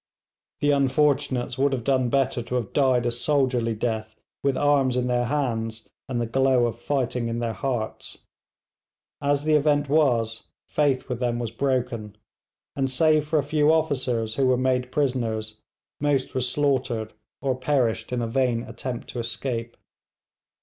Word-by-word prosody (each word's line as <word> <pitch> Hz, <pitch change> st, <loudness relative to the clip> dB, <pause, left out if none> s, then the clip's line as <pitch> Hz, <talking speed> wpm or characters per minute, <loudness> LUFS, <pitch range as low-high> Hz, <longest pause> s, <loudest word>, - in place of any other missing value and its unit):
The 145 Hz, -, +3 dB
unfortunates 140 Hz, -2 st, +1 dB
would 140 Hz, 0 st, +3 dB
have 125 Hz, -3 st, -2 dB
done 130 Hz, -1 st, +2 dB
better 135 Hz, -1 st, +1 dB
to 120 Hz, +2 st, -4 dB
have 120 Hz, -5 st, -2 dB
died 130 Hz, -4 st, +3 dB
a 120 Hz, -, +1 dB
soldierly 125 Hz, -2 st, +1 dB
death, 110 Hz, -1 st, -3 dB, 0.3 s
with 140 Hz, -2 st, +1 dB
arms 140 Hz, -3 st, +3 dB
in 125 Hz, -, +1 dB
their 125 Hz, -1 st, +1 dB
hands 115 Hz, -5 st, -2 dB, 0.2 s
and 125 Hz, -2 st, -1 dB
the 120 Hz, -, 0 dB
glow 130 Hz, +1 st, +3 dB
of 115 Hz, 0 st, -3 dB
fighting 125 Hz, -2 st, -1 dB
in 115 Hz, 0 st, -2 dB
their 115 Hz, -1 st, -2 dB
hearts. 120 Hz, -3 st, -4 dB, 1.0 s
As 145 Hz, 0 st, +1 dB
the 155 Hz, 0 st, +2 dB
event 145 Hz, -1 st, +3 dB
was, 120 Hz, -7 st, +1 dB, 0.2 s
faith 140 Hz, -3 st, +1 dB
with 125 Hz, -2 st, -3 dB
them 120 Hz, -2 st, 0 dB
was 120 Hz, -2 st, -3 dB
broken, 120 Hz, -4 st, -2 dB, 0.6 s
and 135 Hz, -1 st, 0 dB
save 155 Hz, +3 st, +3 dB
for 155 Hz, +1 st, +1 dB
a 145 Hz, -, +2 dB
few 150 Hz, +1 st, +3 dB
officers 125 Hz, -8 st, 0 dB
who 135 Hz, -1 st, +3 dB
were 130 Hz, -1 st, +3 dB
made 125 Hz, 0 st, 0 dB
prisoners, 115 Hz, -6 st, -1 dB, 0.4 s
most 145 Hz, -2 st, 0 dB
were 130 Hz, -, 0 dB
slaughtered, 125 Hz, -4 st, 0 dB, 0.3 s
or 135 Hz, -2 st, 0 dB
perished 125 Hz, -4 st, 0 dB
in 125 Hz, -1 st, -1 dB
a -, -, -1 dB
vain 120 Hz, -1 st, +1 dB
attempt 125 Hz, -1 st, -6 dB
to 125 Hz, -, -5 dB
escape. 115 Hz, 0 st, -4 dB
130 Hz, 160 wpm, -25 LUFS, 115-140 Hz, 1.0 s, The